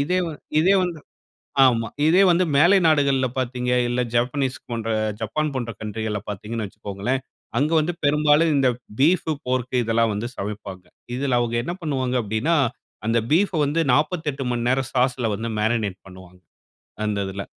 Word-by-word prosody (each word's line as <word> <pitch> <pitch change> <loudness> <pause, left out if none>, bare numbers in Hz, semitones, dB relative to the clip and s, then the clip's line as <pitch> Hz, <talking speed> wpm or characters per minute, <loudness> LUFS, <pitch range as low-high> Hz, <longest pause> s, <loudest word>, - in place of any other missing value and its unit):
இதே 180 +6 +1
வந்து, 155 - -8 0.2
இதே 190 +4 +4
வந்து 170 -3 -4 0.7
ஆமா. 115 -3 +2 0.2
இதே 175 +5 +5
வந்து 175 +2 +3
மேலை 175 +7 +6
நாடுகள்ல 140 -4 +3
பார்த்தீங்க, 125 0 -2 0.2
இல்ல 125 +1 0
ஜப்பனீஸ் 130 +2 0
போன்ற 115 -1 -3 0.3
ஜப்பான் 155 +8 -1
போன்ற 120 -3 -3
கவுண்ட்ரிகள்ல 110 0 -3
பார்த்தீங்கன்னு 105 +2 -4
வச்சுக்கோங்களேன்! 105 +6 -3 0.4
அங்க 150 +5 +1
வந்து 160 +3 -1
பெரும்பாலும் 150 +2 +4
இந்த 135 -2 +3 0.3
பீஃப், 160 +3 +3 0.2
போர்க் 130 0 -2
இதெல்லாம் 115 0 +1
வந்து 105 +4 -3
சமைப்பாங்க. 100 -2 -6 0.3
இதில 130 -1 0
அவுங்க 120 -1 -1
என்ன 170 - -3
பண்ணுவாங்க 130 -5 -1
அப்பிடின்னா, 110 +10 0 0.5
அந்த 115 +1 +2
பீஃப் 195 +4 +3
அ - - +1
வந்து 145 +4 0
48 150 -2 0
மணி 120 -1 -2
நேரம் 130 +1 0
சாஸ்ல 125 -2 +1
வந்து 115 +2 -4
மேரினேட் 105 -3 0
பண்ணுவாங்க. 90 -1 -14 0.7
அந்த 105 -1 -1
இதில. 95 +1 -5
125 Hz, 155 wpm, -23 LUFS, 110-150 Hz, 0.7 s, மேலை